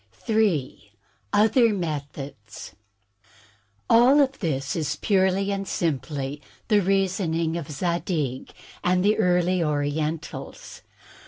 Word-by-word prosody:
*' -, -, -27 dB
J. 175 Hz, -, 0 dB, 0.4 s
Other 220 Hz, +2 st, +4 dB
Methods 140 Hz, -, -6 dB, 1.1 s
All 250 Hz, +5 st, +6 dB
of 275 Hz, -1 st, +2 dB
this 140 Hz, -6 st, -2 dB
is 150 Hz, -3 st, -1 dB
purely 195 Hz, +2 st, +1 dB
and 195 Hz, -1 st, -3 dB
simply 145 Hz, -3 st, -3 dB, 0.3 s
the 210 Hz, -2 st, +4 dB
reasoning 180 Hz, -4 st, 0 dB
of 165 Hz, -4 st, -5 dB
Zadig 155 Hz, -4 st, -2 dB, 0.3 s
and 180 Hz, +1 st, +2 dB
the 210 Hz, +2 st, +3 dB
early 180 Hz, -2 st, +2 dB
Orientals. 150 Hz, +1 st, -3 dB
170 Hz, 100 wpm, -24 LUFS, 145-195 Hz, 1.1 s, All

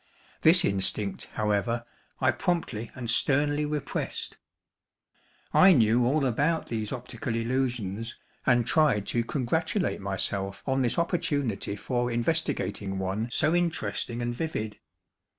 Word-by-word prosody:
This 170 Hz, +3 st, +6 dB
instinct, 100 Hz, +1 st, -1 dB
however, 110 Hz, +3 st, 0 dB, 0.3 s
I 130 Hz, 0 st, +4 dB
promptly 130 Hz, -, -2 dB
and 125 Hz, -2 st, -5 dB
sternly 145 Hz, +5 st, +2 dB
repressed. 150 Hz, -2 st, -3 dB, 1.1 s
I 190 Hz, 0 st, +8 dB
knew 120 Hz, -2 st, +4 dB
all 140 Hz, +2 st, +2 dB
about 145 Hz, +7 st, +1 dB
these 110 Hz, -2 st, -3 dB
optical 120 Hz, -2 st, -4 dB
illusions, 115 Hz, -3 st, -2 dB, 0.3 s
and 120 Hz, -2 st, +3 dB
tried 135 Hz, -10 st, +3 dB
to 120 Hz, -, +1 dB
congratulate 160 Hz, -, -1 dB
myself 100 Hz, 0 st, -2 dB
on 135 Hz, 0 st, +1 dB
this 120 Hz, -2 st, 0 dB
opportunity 145 Hz, -, -1 dB
for 120 Hz, +2 st, -1 dB
investigating 115 Hz, -, -1 dB
one 95 Hz, +5 st, -2 dB
so 150 Hz, +5 st, +2 dB
interesting 165 Hz, -8 st, -1 dB
and 120 Hz, 0 st, -1 dB
vivid. 110 Hz, -7 st, -4 dB
120 Hz, 115 wpm, -28 LUFS, 110-145 Hz, 1.1 s, I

